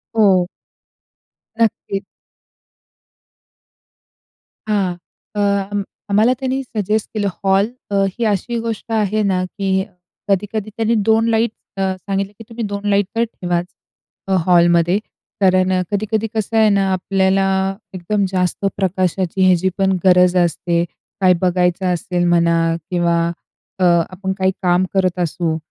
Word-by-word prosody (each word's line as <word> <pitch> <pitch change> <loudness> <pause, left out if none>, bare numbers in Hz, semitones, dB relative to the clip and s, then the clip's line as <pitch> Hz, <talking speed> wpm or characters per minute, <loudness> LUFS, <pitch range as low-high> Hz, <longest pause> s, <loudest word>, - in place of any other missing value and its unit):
हो. 190 -5 +4 1.1
नक्कीच. 205 -3 0 2.6
हां. 195 -4 0 0.4
अ, - - -2 0.7
आम्हाला 215 +5 +4
त्यानी 265 0 -1
सजेस्ट 215 -3 -2
केलं 210 -2 0 0.2
हॉल 195 +1 +3 0.2
अ, - - 0
ही 235 +5 -5
अशी 215 +3 -1
गोष्ट 230 0 -5
आहे 215 -1 +1
ना, 185 -2 +1
की 190 0 -1 0.5
कधी-कधी 210 +2 -1
त्यांनी 225 +1 +1
2 225 +1 +4
लाईट 225 0 +2 0.3
अ, - - -1 0.2
सांगितले 195 +1 -3
की - - -8
तुम्ही 230 0 -5
2 200 0 -4
लाईट 200 0 +3
तर 230 - +2
ठेवाच 175 -6 -2 0.6
अ, 195 - 0
हॉलमध्ये. 175 0 +4 0.4
कारण 185 -1 +3
अ, 185 - +2
कधी-कधी 215 +2 -1
कसं 220 +1 -1
आहे 220 -1 +5
ना, 195 -1 +2
आपल्याला 195 +1 +1 0.5
एकदम 195 +3 -1
जास्त 185 +1 -1
प्रकाशाची 185 -1 0
ह्याची 185 0 +3
पण 190 -1 +2
गरज 180 -1 +5
असते, 170 0 0 0.4
काय 185 -1 +6
बघायचं 180 0 +1
असेल 180 0 -2
म्हणा 170 -1 +3 0.3
किंवा 170 -1 +2 0.6
अ, - - +1 0.3
आपण 190 +1 -4
काही 190 -1 +2
काम 180 0 +2
करत 185 -2 +1
असू, 170 -1 -1
195 Hz, 130 wpm, -18 LUFS, 180-210 Hz, 2.6 s, काय